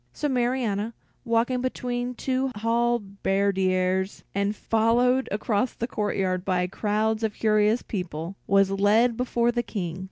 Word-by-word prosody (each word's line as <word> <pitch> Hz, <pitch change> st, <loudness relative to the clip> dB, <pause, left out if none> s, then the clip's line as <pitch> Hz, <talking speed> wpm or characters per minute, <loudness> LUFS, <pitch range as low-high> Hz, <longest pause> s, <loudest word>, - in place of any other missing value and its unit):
So 295 Hz, -, -2 dB
Marianna, 240 Hz, -4 st, 0 dB, 0.3 s
walking 235 Hz, +2 st, +1 dB
between 245 Hz, -1 st, -3 dB
two 260 Hz, +1 st, -1 dB
halberdiers 195 Hz, -4 st, 0 dB
and 200 Hz, +1 st, 0 dB
followed 240 Hz, +5 st, +2 dB
across 210 Hz, +3 st, 0 dB
the 235 Hz, -, -2 dB
courtyard 195 Hz, -5 st, -1 dB
by 180 Hz, -1 st, +1 dB
crowds 215 Hz, +3 st, -1 dB
of 220 Hz, -2 st, -1 dB
curious 215 Hz, +1 st, +2 dB
people, 175 Hz, -2 st, -5 dB
was 195 Hz, 0 st, +4 dB
led 210 Hz, +5 st, +3 dB
before 240 Hz, -1 st, +1 dB
the 240 Hz, 0 st, 0 dB
King. 185 Hz, -7 st, -4 dB
215 Hz, 125 wpm, -25 LUFS, 195-240 Hz, 0.3 s, was